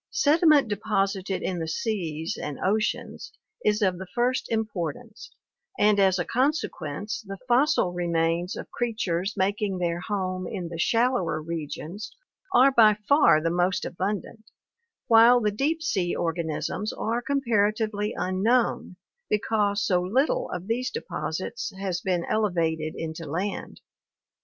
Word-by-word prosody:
Sediment 310 Hz, -, +4 dB
deposited 195 Hz, -2 st, -1 dB
in 180 Hz, -2 st, -2 dB
the 160 Hz, -, -3 dB
seas 165 Hz, -4 st, -2 dB
and 150 Hz, -2 st, -5 dB
oceans 215 Hz, +3 st, -1 dB, 0.3 s
is 210 Hz, 0 st, +2 dB
of 185 Hz, -2 st, +1 dB
the 190 Hz, -, -7 dB
first 250 Hz, +1 st, +1 dB
im 220 Hz, -1 st, +1 dB
portance, 210 Hz, -, -6 dB, 0.5 s
and 210 Hz, -1 st, +4 dB
as 190 Hz, -1 st, +4 dB
a 175 Hz, -, -1 dB
consequence 220 Hz, -, -2 dB
the 195 Hz, 0 st, -6 dB
fossil 245 Hz, -, +3 dB
remains 170 Hz, 0 st, 0 dB
of -, -, -8 dB
creatures 205 Hz, -5 st, -2 dB
making 200 Hz, 0 st, 0 dB
their 170 Hz, -1 st, -1 dB
home 185 Hz, -1 st, -3 dB
in 180 Hz, -5 st, -5 dB
the 165 Hz, -1 st, -7 dB
shallower 230 Hz, -5 st, +1 dB
regions 165 Hz, +4 st, -6 dB, 0.4 s
are 265 Hz, +3 st, +6 dB
by 220 Hz, -4 st, +6 dB
far 225 Hz, -, +6 dB
the 165 Hz, -, +1 dB
most 180 Hz, +2 st, +1 dB
abundant, 205 Hz, +4 st, -4 dB, 0.6 s
while 235 Hz, +1 st, +7 dB
the 210 Hz, -3 st, +1 dB
deep 300 Hz, +9 st, -1 dB
sea 190 Hz, -, 0 dB
organisms 170 Hz, +5 st, -2 dB
are 230 Hz, +2 st, -2 dB
comparatively 215 Hz, -5 st, 0 dB
un 185 Hz, 0 st, -2 dB
known 235 Hz, -4 st, +1 dB, 0.3 s
because 210 Hz, -1 st, +1 dB
so 180 Hz, -2 st, +2 dB
little 275 Hz, -, +1 dB
of 180 Hz, -, -5 dB
these 240 Hz, +4 st, -1 dB
deposits 460 Hz, 0 st, -4 dB
has 190 Hz, -3 st, -3 dB
been 180 Hz, -3 st, -1 dB
elevated 165 Hz, -7 st, 0 dB
into 160 Hz, 0 st, -5 dB
land. 180 Hz, +7 st, -4 dB
200 Hz, 135 wpm, -26 LUFS, 175-230 Hz, 0.6 s, while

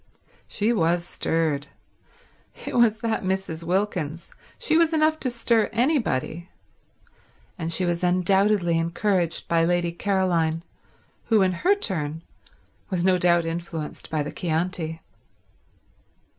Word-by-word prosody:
She 215 Hz, +3 st, 0 dB
was 170 Hz, -3 st, +1 dB
stirred. 155 Hz, -5 st, -1 dB, 1.0 s
It -, -, -4 dB
was 225 Hz, -2 st, +3 dB
that 225 Hz, -2 st, -1 dB
Mrs. 185 Hz, -4 st, -2 dB
Wilkins. 175 Hz, -3 st, -2 dB, 0.2 s
She 315 Hz, -, +1 dB
was 330 Hz, 0 st, +4 dB
enough 310 Hz, 0 st, +2 dB
to 255 Hz, -, -1 dB
stir 230 Hz, -2 st, +1 dB
anybody. 225 Hz, -, 0 dB, 1.1 s
And 165 Hz, -1 st, -4 dB
she 180 Hz, +3 st, +1 dB
was 175 Hz, 0 st, -1 dB
undoubtedly 185 Hz, 0 st, +2 dB
encouraged 170 Hz, +1 st, 0 dB
by 165 Hz, -1 st, +2 dB
Lady 175 Hz, 0 st, +1 dB
Caroline, 170 Hz, -4 st, 0 dB, 0.6 s
who, 220 Hz, -4 st, +4 dB
in 185 Hz, -, +2 dB
her 360 Hz, -, +2 dB
turn, 160 Hz, -, -3 dB, 0.7 s
was 180 Hz, -3 st, -1 dB
no 185 Hz, -1 st, +3 dB
doubt 175 Hz, -1 st, +3 dB
influenced 165 Hz, -2 st, -5 dB
by 155 Hz, -2 st, -1 dB
the 145 Hz, -, -5 dB
Chianti. 165 Hz, -1 st, -2 dB
175 Hz, 120 wpm, -24 LUFS, 165-210 Hz, 1.1 s, was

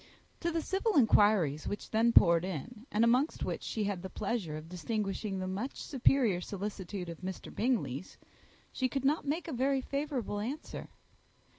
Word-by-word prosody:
To 340 Hz, -, 0 dB
the 325 Hz, -1 st, -1 dB
civil 390 Hz, 0 st, +1 dB
inquiries 205 Hz, -, +4 dB
which 205 Hz, -, -5 dB
then 225 Hz, +2 st, +4 dB
poured 170 Hz, -6 st, +6 dB
in, 190 Hz, -, -6 dB
and 215 Hz, +2 st, +3 dB
amongst 250 Hz, +6 st, +2 dB
which -, -, -3 dB
she 220 Hz, -, -2 dB
had 200 Hz, -3 st, -2 dB
the 190 Hz, -, -6 dB
pleasure 195 Hz, -7 st, -2 dB
of 155 Hz, +1 st, -9 dB
distinguishing 195 Hz, +2 st, -2 dB
the 185 Hz, 0 st, -3 dB
much 200 Hz, +8 st, -3 dB
superior 245 Hz, -8 st, +2 dB
solicitude 195 Hz, -1 st, -5 dB
of 170 Hz, -2 st, -7 dB
Mr. 185 Hz, 0 st, -6 dB
Bingley, 220 Hz, -, 0 dB, 0.7 s
she 260 Hz, -1 st, 0 dB
could 275 Hz, 0 st, -2 dB
not 295 Hz, +1 st, +2 dB
make 320 Hz, +5 st, -1 dB
a 320 Hz, -, -4 dB
very 265 Hz, +2 st, +2 dB
favourable 275 Hz, -6 st, -2 dB
answer. 265 Hz, +9 st, -5 dB
215 Hz, 165 wpm, -32 LUFS, 185-265 Hz, 0.7 s, poured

